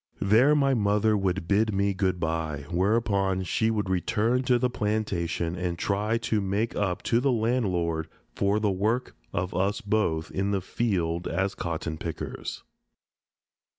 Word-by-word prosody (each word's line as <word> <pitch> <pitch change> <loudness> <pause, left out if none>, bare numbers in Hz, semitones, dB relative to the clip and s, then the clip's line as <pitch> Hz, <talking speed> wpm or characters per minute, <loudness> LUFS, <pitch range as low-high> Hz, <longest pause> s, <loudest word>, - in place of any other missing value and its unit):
There 115 +9 +5
my 140 -2 +3
mother 105 -1 +2
would 95 -3 -1
bid 105 +1 +2
me 100 0 +2
good 95 -1 0
bye, 80 -3 -2
whereupon 95 0 +1
she 110 +5 +1
would 105 -3 -1
return 110 +7 +1
to 125 -1 +4
the 125 +1 +2
plantation 95 -7 -1
and 90 -1 -2
try 105 +5 0
to 110 -2 +1
make 100 +4 -1
up 95 -3 -1
to 115 - +2
the 135 +2 +2
landlord 95 -9 0 0.3
for 100 +2 +1
the 105 -2 +1
work 110 +7 -1 0.2
of 90 +1 -2
us 95 +3 0
both 100 -7 0
in 95 +1 -1
the 100 -1 +1
field 90 -5 -1
as 95 +3 -1
cotton 80 -2 -4
pickers. 85 -2 -5
100 Hz, 150 wpm, -27 LUFS, 90-110 Hz, 0.3 s, There